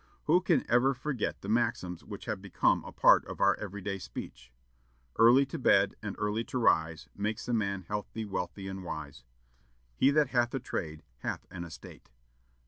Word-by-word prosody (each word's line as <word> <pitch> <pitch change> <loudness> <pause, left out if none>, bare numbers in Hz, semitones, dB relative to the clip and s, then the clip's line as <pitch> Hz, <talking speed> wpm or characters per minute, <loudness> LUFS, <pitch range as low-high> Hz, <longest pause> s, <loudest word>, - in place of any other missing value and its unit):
Who 175 +4 +4
can 170 -7 +2
ever 130 +3 +3
forget 130 -2 -3
the - - -8
maxims 90 -6 0
which 100 -2 -9
have 110 -6 -3
become 100 -2 +1
a - - -9
part - - +5
of - - -8
our - - +5
every 105 -1 -6
day 100 -1 -3
speech? - - -9 0.7
"Early 120 +4 +7
to 160 +4 -6
bed 100 -5 +4
and 105 -3 -5
early 105 +2 -1
to - - -4
rise, 80 -8 +2
makes 105 +2 -3
a 120 - -1
man 100 -4 -1
healthy, 105 +4 -4
wealthy, 95 -1 -4
and 95 0 -6
wise." 75 -7 -7 0.7
"He 135 - +4
that 145 -1 +3
hath 120 -1 +1
a - - -1
trade, 80 -10 -5 0.2
hath - - -4
an 90 -2 -6
estate." 80 -2 -12
105 Hz, 180 wpm, -30 LUFS, 90-120 Hz, 0.7 s, Early